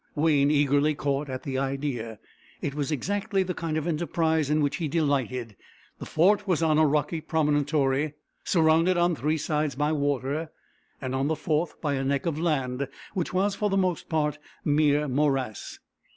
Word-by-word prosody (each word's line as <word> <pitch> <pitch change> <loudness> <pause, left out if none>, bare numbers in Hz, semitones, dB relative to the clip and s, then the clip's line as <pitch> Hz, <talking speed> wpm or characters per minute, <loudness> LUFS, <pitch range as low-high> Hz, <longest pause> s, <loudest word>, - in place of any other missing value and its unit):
Wayne 145 -2 +3
eagerly 145 +1 +3
caught 140 0 -1
at 130 -1 -5
the 135 -2 -2
idea. 135 -5 -3 0.4
It 140 - -3
was 145 +1 -2
exactly 195 - 0
the 180 0 -3
kind 165 -2 -3
of 155 - -2
enterprise 160 -2 0
in 150 +1 +2
which 145 -1 0
he 165 - -2
delighted. 130 -7 -1 0.4
The - - -7
fort 200 +6 +3
was 170 -3 +1
on 155 -1 +3
a 155 - +5
rocky 150 +2 0
promontory, 150 -2 +1 0.3
surrounded 165 +1 +3
on 175 0 +3
three 150 +4 0
sides 150 -2 -1
by 150 +2 0
water, 145 +1 -1 0.5
and 130 -1 -4
on 135 +1 0
the 160 - +1
fourth 155 +1 -1
by 145 -3 0
a 135 -1 -1
neck 140 +3 0
of 160 -3 -1
land, 140 -5 -1 0.3
which 180 -4 -2
was 195 +2 +1
for 210 +1 -1
the 195 - +1
most 185 -3 0
part 150 -2 0 0.3
mere 150 0 +3
morass. 135 -4 -1
150 Hz, 175 wpm, -26 LUFS, 140-160 Hz, 0.5 s, a